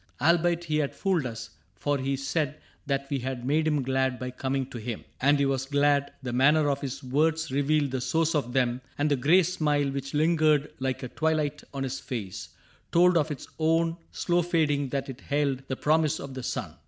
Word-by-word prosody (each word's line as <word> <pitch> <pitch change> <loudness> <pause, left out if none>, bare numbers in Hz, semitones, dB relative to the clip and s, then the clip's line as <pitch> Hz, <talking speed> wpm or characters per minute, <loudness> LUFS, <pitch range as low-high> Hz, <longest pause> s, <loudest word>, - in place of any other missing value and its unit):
Albeit 170 +3 +3
he 155 -3 -1
had 145 -2 -1
fooled 180 -9 0
us, 115 -1 -7
— 90 +5 -40
for 145 +7 -1
he 135 +1 -1
said 140 +2 -2 0.3
That 140 -1 -1
we 140 - 0
had 125 -1 -4
made 155 +4 +2
him 150 -3 +1
glad 130 0 0
by 125 +1 -5
coming 135 +1 -2
to 120 - -6
him. 110 +1 -5 0.2
And 145 +2 +4
he 140 - +2
was 135 -1 -1
glad: 145 0 +2
the 125 -2 -3
manner 145 +3 +4
of 140 - -2
his 135 -1 -5
words 155 +4 +1
Revealed 145 +1 +1
the 130 -1 -2
source 165 +4 +1
of 140 -6 -1
them; 125 -1 +1 0.2
and 145 +1 +1
the - - +5
gray 155 +8 +4
smile 150 -5 0
Which 135 +1 -4
lingered 155 -2 +3
like 130 0 -2
a - - -3
twilight 155 +1 -1
on 135 -1 -3
his 135 0 -3
face 105 -7 -6 0.4
Told 180 +1 +5
of 155 -2 +2
its 145 -4 -6
own 165 +1 +2 0.2
slow 175 0 +1
fading 150 -5 +1
that 135 +1 -2
it 135 -1 -8
held 140 -2 0
The 130 - -2
promise 155 +2 +2
of 140 -1 -7
the 130 - -5
sun. - - -4
140 Hz, 210 wpm, -27 LUFS, 130-155 Hz, 0.4 s, the